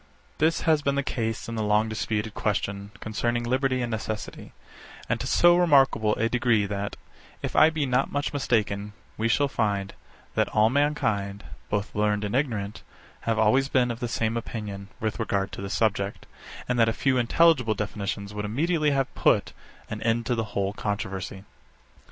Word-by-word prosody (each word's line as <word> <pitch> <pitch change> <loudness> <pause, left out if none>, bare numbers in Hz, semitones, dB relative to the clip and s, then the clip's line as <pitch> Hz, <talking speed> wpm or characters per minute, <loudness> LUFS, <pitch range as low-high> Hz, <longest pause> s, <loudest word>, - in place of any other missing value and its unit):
63. 155 - +5
This 165 - -1
has 155 -2 +3
been 140 -1 0
the 140 - 0
case 115 -4 -3
in 115 - -5
the 110 - -2
long 105 +1 +2
disputed 110 -1 -2
question 100 -1 -2
concerning 120 +2 -1
liberty 130 +1 +1
and 120 - -3
necessity; 110 -1 -5 0.6
and - - 0
to - - -3
so 175 0 +5
remarkable 135 -10 +4
a 115 - +1
degree 120 -3 +2
that, 100 0 -3 0.5
if - - -3
I 155 - +7
be 160 -3 -1
not 130 +1 +1
much 145 +1 -2
mistaken, 105 -6 0 0.2
we 110 - 0
shall 140 +5 +3
find, 105 -7 -1 0.4
that - - +2
all 110 +1 +3
mankind, 110 -9 0 0.3
both 105 0 -2
learned 105 0 +1
and 105 +2 -2
ignorant, 110 -8 -1 0.5
have 115 - +2
always 130 +5 +3
been 125 -3 +2
of 115 - -6
the 120 - -2
same 115 0 -1
opinion 105 -4 -5
with 110 +1 -2
regard 100 -3 -1
to - - -7
this 100 +1 -3
subject, 100 -3 0 0.4
and 125 -1 0
that 115 -1 +5
a - - 0
few 130 +1 +1
intelligible 125 -2 +3
definitions 100 0 -4
would 105 0 -4
immediately 150 +8 +1
have 135 -2 0
put - - +2 0.3
an 110 0 -6
end 115 +1 +1
to 125 - 0
the 115 -2 -1
whole 100 0 0
controversy. 95 -2 -4
110 Hz, 180 wpm, -26 LUFS, 105-130 Hz, 0.6 s, I